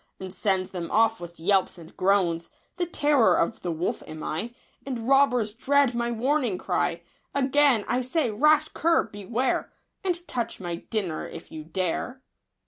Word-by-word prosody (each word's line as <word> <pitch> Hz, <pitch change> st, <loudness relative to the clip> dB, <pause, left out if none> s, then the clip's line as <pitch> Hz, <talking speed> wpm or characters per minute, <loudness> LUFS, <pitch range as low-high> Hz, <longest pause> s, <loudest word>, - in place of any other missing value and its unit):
And 190 Hz, -1 st, -7 dB
sends 190 Hz, -3 st, 0 dB
them 175 Hz, -3 st, -5 dB
off 225 Hz, 0 st, +3 dB
with 170 Hz, -1 st, -10 dB
yelps 190 Hz, +3 st, +2 dB
and 165 Hz, -1 st, -13 dB
groans; 180 Hz, -4 st, +1 dB, 0.3 s
The 350 Hz, -2 st, -1 dB
terror 295 Hz, -7 st, +3 dB
of 230 Hz, -, 0 dB
the 175 Hz, -, -2 dB
wolf 165 Hz, +2 st, -2 dB
am 155 Hz, 0 st, -8 dB
I, 210 Hz, +10 st, -3 dB, 0.3 s
And 245 Hz, -4 st, -5 dB
robbers 255 Hz, -6 st, +3 dB
dread 275 Hz, +2 st, +2 dB
my 235 Hz, 0 st, -1 dB
warning 245 Hz, -2 st, 0 dB
cry. -, -, -1 dB, 0.3 s
Again 275 Hz, -4 st, +3 dB
I 250 Hz, +1 st, +1 dB
say, 255 Hz, 0 st, 0 dB
rash 305 Hz, +7 st, +4 dB
cur, 335 Hz, +1 st, +2 dB
beware. 220 Hz, +5 st, -2 dB, 0.3 s
And 350 Hz, -2 st, -2 dB
touch 235 Hz, -2 st, -3 dB
my 175 Hz, -2 st, -4 dB
dinner 185 Hz, -4 st, -3 dB
if 165 Hz, -, -10 dB
you 155 Hz, -1 st, -7 dB
dare 185 Hz, +10 st, -3 dB
225 Hz, 160 wpm, -26 LUFS, 185-270 Hz, 0.3 s, rash